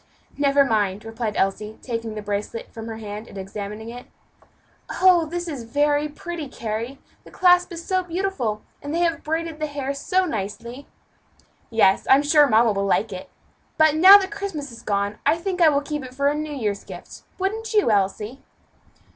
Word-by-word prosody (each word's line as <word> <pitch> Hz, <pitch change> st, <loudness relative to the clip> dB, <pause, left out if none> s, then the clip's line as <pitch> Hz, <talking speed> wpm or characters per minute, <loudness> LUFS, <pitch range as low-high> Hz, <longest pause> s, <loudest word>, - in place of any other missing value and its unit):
"Never 280 Hz, -1 st, +3 dB
mind," 210 Hz, -4 st, 0 dB
replied 225 Hz, -1 st, -4 dB
Elsie, 210 Hz, +3 st, -1 dB
taking 230 Hz, -3 st, -4 dB
the 210 Hz, -, -6 dB
bracelet 205 Hz, +3 st, -4 dB
from 225 Hz, 0 st, -7 dB
her 225 Hz, -1 st, -6 dB
hand, 210 Hz, 0 st, -7 dB
and 200 Hz, -, -11 dB
examining 205 Hz, +3 st, -6 dB
it. 245 Hz, +1 st, -9 dB, 0.9 s
"Oh! 360 Hz, -3 st, +5 dB
this 350 Hz, +2 st, -4 dB
is 285 Hz, -6 st, -5 dB
very 290 Hz, +5 st, +1 dB
pretty, 325 Hz, +1 st, -6 dB
Carry! 230 Hz, +2 st, -5 dB, 0.3 s
the -, -, -14 dB
clasp 360 Hz, -1 st, +4 dB
is 335 Hz, 0 st, -7 dB
so 375 Hz, -1 st, +1 dB
beautiful, 340 Hz, -, -2 dB, 0.2 s
and 290 Hz, +2 st, -4 dB
they 340 Hz, -, +1 dB
have 335 Hz, -1 st, 0 dB
braided 320 Hz, 0 st, -3 dB
the 305 Hz, -, -1 dB
hair 280 Hz, -2 st, -3 dB
so 370 Hz, +7 st, 0 dB
nicely." 235 Hz, -, -5 dB, 0.8 s
"Yes, 210 Hz, -4 st, +3 dB
I'm 275 Hz, +2 st, +6 dB
sure 295 Hz, 0 st, +5 dB
mamma 225 Hz, 0 st, +4 dB
will 200 Hz, -1 st, -1 dB
like 205 Hz, +2 st, +1 dB
it. 185 Hz, -, -8 dB, 0.5 s
But 315 Hz, -2 st, +5 dB
now 375 Hz, +6 st, +10 dB
that 390 Hz, 0 st, -3 dB
Christmas 390 Hz, -9 st, -5 dB
is 230 Hz, -, -11 dB
gone, 200 Hz, 0 st, -1 dB
I 330 Hz, -, +3 dB
think 365 Hz, +1 st, -3 dB
I 325 Hz, -, +7 dB
will 285 Hz, -1 st, +1 dB
keep 295 Hz, 0 st, -4 dB
it 255 Hz, 0 st, -10 dB
for 280 Hz, +1 st, +2 dB
a -, -, 0 dB
New 305 Hz, +1 st, -4 dB
Year's 210 Hz, -8 st, -3 dB
gift. -, -, -11 dB, 0.2 s
Wouldn't 430 Hz, +4 st, -2 dB
you, 415 Hz, -, +4 dB
Elsie?" 210 Hz, +5 st, -1 dB
275 Hz, 185 wpm, -23 LUFS, 215-330 Hz, 0.9 s, now